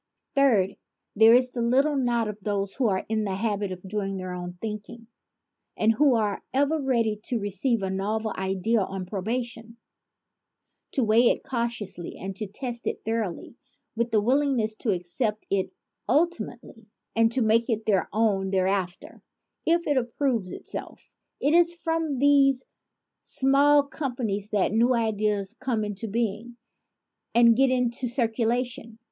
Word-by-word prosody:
Third, 230 -9 +3 0.4
there 225 +2 +7
is 250 0 +3
the 240 - -3
little 270 +6 +2
knot 240 -4 +1
of 210 0 -6
those 200 -1 -2
who 260 -3 +1
are 190 -2 0
in 220 0 0
the 195 -2 -2
habit 205 -1 -1
of 185 +1 -8
doing 195 -1 -3
their 185 -1 -5
own 180 0 -6
thinking 220 +2 -6 0.7
and 220 +1 +3
who 270 +2 +4
are 210 -3 0
ever 285 +3 +1
ready 230 -5 +1
to 245 - -1
receive 205 +2 -1
a 190 - -1
novel 215 +3 -2
idea 190 +4 0
on 190 -1 -4
probation, 230 +4 -4 1.2
to 265 - +1
weigh 225 +2 +5
it - - 0
cautiously 235 -8 -4
and 195 0 -6
to 215 - -4
test 240 +3 -6
it - - -3
thoroly 220 -6 -3 0.4
with 235 +1 -1
willingness 235 +1 +2
to 225 - -3
accept 210 +4 -2
it 195 -1 0 0.4
ultimately 310 -8 -1 0.3
and 225 0 +4
to 255 - +1
make 225 +2 +2
it 220 -1 -1
their 195 -3 +1
own 200 -3 +1
thereafter 190 -1 -1 0.5
if 340 +1 +3
it 290 -2 +1
approves 240 -5 -1
it - - -9
self. - - -8 0.3
It 290 - +2
is 345 0 +4
from 325 -4 -2
this 275 -1 +4 0.6
small 280 +2 +3
company 250 -8 -3
that 205 -1 +1
new 235 +4 +3
ideas 210 -3 0
come 245 -4 -1
into 210 +1 -4
being, 230 +2 -3 0.8
and 235 -1 +6
get 270 +2 +4
into 250 0 0
circulation. 235 -1 -1
225 Hz, 150 wpm, -26 LUFS, 205-255 Hz, 1.2 s, there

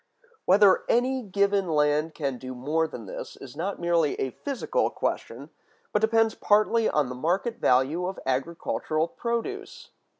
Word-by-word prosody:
Whether 195 0 +5
any 255 +2 +2
given 200 -2 +1
land 150 +1 +1
can 135 -5 -3
do 130 0 -7
more 155 +6 0
than 120 -7 -9
this - - -7
is 135 0 -11
not 185 +6 -3
merely 170 -3 +1
a 130 - -1
physical 275 - -1
question, - - -4 0.4
but 210 - +2
depends 225 0 +3
partly 215 +2 +2
on 150 -3 +1
the 125 - -5
market 180 - -1
value 140 +8 +2
of 190 - -5
agricultural 155 +3 -1
produce. 235 - -4
170 Hz, 145 wpm, -26 LUFS, 145-215 Hz, 0.4 s, Whether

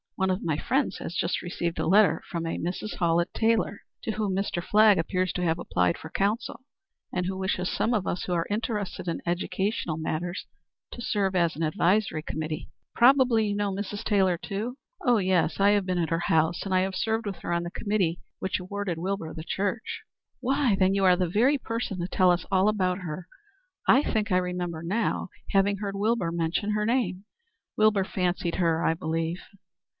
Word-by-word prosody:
One 190 0 +1
of 185 - -2
my 155 -3 0
friends 265 - 0
has 175 - -6
just 170 - 0
received 175 -1 -3
a - - 0
letter 200 +4 +5
from 170 -2 -3
a 165 - -2
Mrs. 180 +5 -4
Hallett 170 -1 +1
Taylor, 225 -2 +1 0.2
to 225 - -1
whom 210 -3 -1
Mr. 190 -3 -1
Flagg 210 -1 +5
appears 185 +2 0
to 180 - -2
have 165 -1 +1
applied 90 - 0
for 160 - -10
counsel, 225 +5 -1 0.5
and 180 - -1
who 190 +1 -2
wishes 190 -1 -1
some 235 - +1
of 210 -4 0
us 175 - -2
who 180 - -2
are 170 -1 +1
interested 205 -4 -3
in 170 - -2
educational 175 -1 -1
matters 165 +3 -3 0.5
to 240 - -8
serve 195 -4 0
as 170 -2 +2
an 160 - -3
advisory 180 +1 +1
committee. 155 0 -4 0.3
Probably 245 -3 +5
you 205 - -1
know 205 -1 0
Mrs. 205 +1 -4
Taylor 190 -4 +2
too?" 215 +8 -4 0.3
"Oh 245 -2 +4
yes. 185 -4 +1
I 200 +1 +5
have 205 -2 +1
been 180 -1 0
at 165 -2 0
her 165 -1 +1
house, 160 0 +1
and 195 - -2
I 185 +1 +3
served 225 +3 -1
with 195 - -4
her - - -5
on 170 0 0
the 175 - -5
committee 190 -6 0 0.2
which 190 - -1
awarded 185 -2 -4
Wilbur 185 -2 -3
the 160 - -7
church." 200 +6 -2 0.4
"Why, 265 -3 +2
then 190 0 +4
you 195 0 +1
are 185 -1 +6
the 180 0 0
very 245 - +3
person 230 -6 -4
to 175 - -2
tell 185 0 +3
us 175 - 0
all 190 +2 +4
about 185 -3 0
her. 175 0 -6 0.6
I 275 - +6
think 220 -5 -1
I 180 - +4
remember 180 -2 -2
now 200 +2 -1 0.2
having 200 +1 +3
heard 200 -1 -4
Wilbur 205 -4 +1
mention 170 +5 -1
her 210 0 0
name." 225 -5 0 0.5
"Wilbur 215 -2 +4
fancied 180 -2 -1
her, 165 -3 +1
I 160 - +3
believe." 165 +2 -2
190 Hz, 195 wpm, -27 LUFS, 175-210 Hz, 0.6 s, are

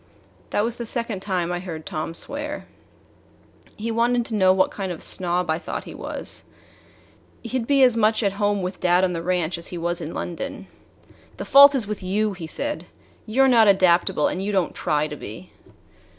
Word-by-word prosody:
That 205 - +1
was 235 +1 -2
the 235 - -5
second 230 -4 -3
time 180 -3 -1
I 175 - -2
heard 165 -4 -7
Tom 155 +2 -4
swear. 295 - -5 1.1
He 230 +2 -3
wanted 235 +1 +1
to 230 - -7
know 190 -3 +4
what 185 0 +2
kind 195 -2 -4
of 175 - -5
a - - -7
snob 180 -1 -1
I 160 0 0
thought - - -5
he - - -10
was. - - -6 1.0
He'd 235 0 -3
be 275 -2 +4
as 250 -3 +5
much 220 0 +2
at 200 - +2
home 205 -2 +1
with 180 0 -4
dad 180 +1 +3
on 180 -1 +1
the 165 - -3
ranch 175 -1 -1
as 170 - -6
he 175 - -6
was 170 +1 -2
in 160 - -6
London. 175 +11 -5 0.7
"The - - -5
fault 280 +1 +8
is 250 -5 +1
with 210 0 -5
you," 205 +3 0
he 175 -4 -7
said. 290 - -4 0.4
"You 245 +5 +3
're - - +5
not 230 -4 +5
adaptable, 180 -5 +4
and 185 - -3
you 205 - -1
don't 190 -4 0
try 150 0 0
to 150 - -7
be." 105 -8 -9
195 Hz, 205 wpm, -23 LUFS, 175-230 Hz, 1.1 s, fault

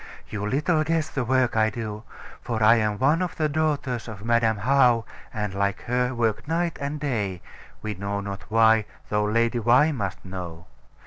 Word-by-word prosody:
You 105 -1 -3
little 150 +6 +1
guess 160 0 0
the 135 - -2
work 130 0 +1
I 110 0 +3
do. 110 -2 -5 0.4
For 110 -2 -2
I 115 +2 +7
am 105 -2 0
one 145 - +2
of 180 -2 -2
the 155 - +1
daughters 145 -6 -1
of 105 -1 -8
Madam 115 -2 +2
How, 125 0 +3 0.3
and, 105 -2 -3
like 100 0 -1
her, 125 +1 -1
work 115 +1 -1
night 170 +1 -1
and 145 +2 -3
day, 105 -11 -2 0.4
we 110 -1 -2
know 100 +1 -3
not 100 -1 -7
why, 110 -1 +4 0.2
though 105 0 +1
Lady 115 +3 +1
Why 125 +7 +4
must 100 - -4
know. 90 -3 -7
115 Hz, 180 wpm, -25 LUFS, 105-135 Hz, 0.4 s, I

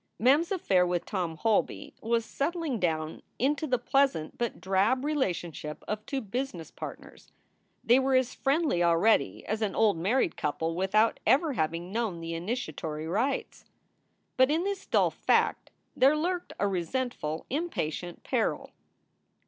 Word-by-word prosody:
Mem 260 +6 +5
s 335 - -5
affair 195 - +2
with 175 -1 -1
Tom 175 -5 -3
Holby 220 +4 0
was 230 0 0
settling 305 -3 -2
down 160 -3 -1 0.2
into 290 +5 0
the 255 -2 +2
pleasant 260 - +1
but 235 -2 -3
drab 195 +8 +1
relationship 175 - -2
of 215 0 -3
two 270 -1 -2
business 215 -6 -4
partners. - - -10 0.5
They 240 +3 +5
were 265 0 +2
as 255 -1 +2
friendly 280 - +1
already 170 +6 +3
as 215 +1 -2
an 210 -2 -1
old 215 -5 +3
married 195 +5 +1
couple 160 +2 -2
with 190 +4 -2
out 220 +2 +4
ever 295 +2 +4
having 165 -2 -2
known 220 -6 -2
the 165 0 -5
initiatory 165 - -4
rites. 225 +11 -1 0.7
But 260 +1 +5
in 320 +3 +1
this 400 0 -3
dull - - +3
fact - - +1 0.3
there 275 +4 +5
lurked 355 +3 -2
a 200 - +2
resentful, 185 -3 -2
impatient 180 - -3
peril. - - -1
220 Hz, 150 wpm, -29 LUFS, 175-270 Hz, 0.7 s, Mem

